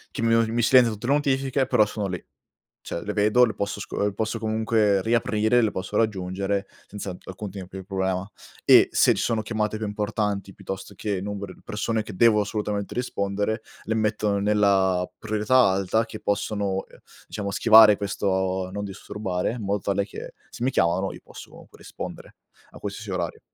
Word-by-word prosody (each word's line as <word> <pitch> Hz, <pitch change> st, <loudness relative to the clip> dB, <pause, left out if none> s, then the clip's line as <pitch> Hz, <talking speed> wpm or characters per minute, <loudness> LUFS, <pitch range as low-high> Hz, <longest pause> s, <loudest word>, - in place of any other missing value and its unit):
Che -, -, -2 dB
mi 115 Hz, 0 st, +3 dB
u 115 Hz, -, +5 dB
mi 120 Hz, +1 st, +1 dB
si -, -, +3 dB
silenzia 125 Hz, -3 st, +6 dB
tutte 110 Hz, +2 st, -7 dB
le 135 Hz, -, +3 dB
notifiche 135 Hz, -2 st, +1 dB
però 105 Hz, -, +4 dB
sono 105 Hz, -1 st, -3 dB
lì, 90 Hz, -2 st, -4 dB, 0.6 s
cioè 85 Hz, -, -5 dB
le 105 Hz, -, -3 dB
vedo, 105 Hz, +4 st, +4 dB
le 110 Hz, -4 st, -4 dB
posso 100 Hz, 0 st, -3 dB
sco 100 Hz, -, -3 dB
le 105 Hz, -1 st, 0 dB
posso 110 Hz, +3 st, -2 dB
comunque 110 Hz, -2 st, +1 dB
riaprire, 110 Hz, +1 st, +2 dB
le 110 Hz, -, +1 dB
posso 95 Hz, +2 st, -4 dB
raggiungere 100 Hz, -2 st, -1 dB, 0.2 s
senza 100 Hz, -3 st, -7 dB
alcun 95 Hz, +2 st, -7 dB
tipo 95 Hz, -1 st, -9 dB
di 95 Hz, -, -6 dB
problema. 95 Hz, 0 st, -2 dB, 0.3 s
E -, -, +7 dB
se -, -, +4 dB
ci -, -, -1 dB
sono 115 Hz, -2 st, 0 dB
chiamate 110 Hz, 0 st, -2 dB
più 110 Hz, 0 st, -3 dB
importanti, 105 Hz, -1 st, -2 dB
piuttosto 95 Hz, +2 st, -7 dB
che 100 Hz, 0 st, -2 dB
numeri 100 Hz, -1 st, -6 dB
di -, -, -21 dB
persone 110 Hz, +1 st, -2 dB
che 105 Hz, -2 st, -9 dB
devo 110 Hz, +1 st, +5 dB
assolutamente 105 Hz, -1 st, -3 dB
rispondere, 105 Hz, -2 st, -2 dB, 0.2 s
le 110 Hz, -, -1 dB
mettono 105 Hz, -1 st, 0 dB
nella 100 Hz, -3 st, +2 dB
priorità 110 Hz, +3 st, +1 dB
alta 100 Hz, +4 st, +1 dB
che 110 Hz, -, -9 dB
possono, 100 Hz, -2 st, -1 dB
ehm, -, -, -19 dB, 0.3 s
diciamo 100 Hz, -2 st, -4 dB
schivare 105 Hz, +1 st, +7 dB
questo 95 Hz, -2 st, -1 dB
non 100 Hz, +1 st, -4 dB
disturbare, 95 Hz, -1 st, -3 dB
in 120 Hz, -3 st, -6 dB
modo 100 Hz, +1 st, 0 dB
tale 100 Hz, 0 st, 0 dB
che 100 Hz, -, -9 dB, 0.2 s
se -, -, -6 dB
mi 130 Hz, -, +3 dB
chiamano 95 Hz, -4 st, +1 dB
io -, -, -10 dB
posso -, -, -13 dB
rispondere -, -, -9 dB, 0.3 s
a -, -, -14 dB
qualsiasi 100 Hz, +1 st, -6 dB
orario. 90 Hz, -3 st, -3 dB
105 Hz, 185 wpm, -25 LUFS, 95-110 Hz, 0.6 s, E